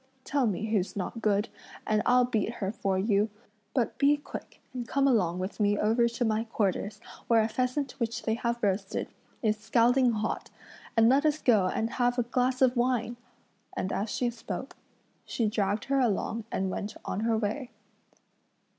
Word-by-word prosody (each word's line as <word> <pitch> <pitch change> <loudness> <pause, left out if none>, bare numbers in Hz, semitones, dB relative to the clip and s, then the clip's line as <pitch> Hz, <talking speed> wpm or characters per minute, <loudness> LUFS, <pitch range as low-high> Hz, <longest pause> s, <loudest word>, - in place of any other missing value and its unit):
Tell 275 -3 +1
me 210 +1 -1
who's 200 -4 0
not 205 +4 -4
good, 210 0 +2 0.4
and 215 0 +2
I'll 250 0 +5
beat 225 -2 -1
her 195 -4 -3
for 195 -4 -1
you; 205 +2 +2 0.5
but 245 -4 0
be 290 +1 +5
quick 290 - -9
and 245 -2 -5
come 275 +2 +2
along 185 -9 +2
with 185 +4 -4
me 205 0 +3
over 225 +3 +3
to 235 +1 -1
my 220 0 +1
quarters, 210 -2 -1 0.3
where 225 -2 +5
a - - +1
pheasant 255 +4 -1
which 230 -1 -2
they 220 - +1
have 235 +1 -2
roasted 195 -1 -1 0.3
is 215 -1 +2
scalding 240 +3 +3
hot, 215 0 -2 0.5
and 225 0 +6
let 270 +4 +4
us 305 0 +2
go 215 -9 +4
and 220 +4 0
have 245 0 +1
a 245 - +2
glass 250 +2 +1
of 255 0 +4
wine!" 240 -1 0 0.6
And 190 - -1
as 210 +3 -1
she 240 +2 0
spoke, 235 +3 -6 0.5
she 230 - -1
dragged 205 0 0
her 275 0 +1
along 225 -1 0
and 190 0 -1
went 205 +3 -4
on - - -2
her 225 0 +1
way. 225 +5 -2
225 Hz, 180 wpm, -29 LUFS, 210-245 Hz, 0.6 s, and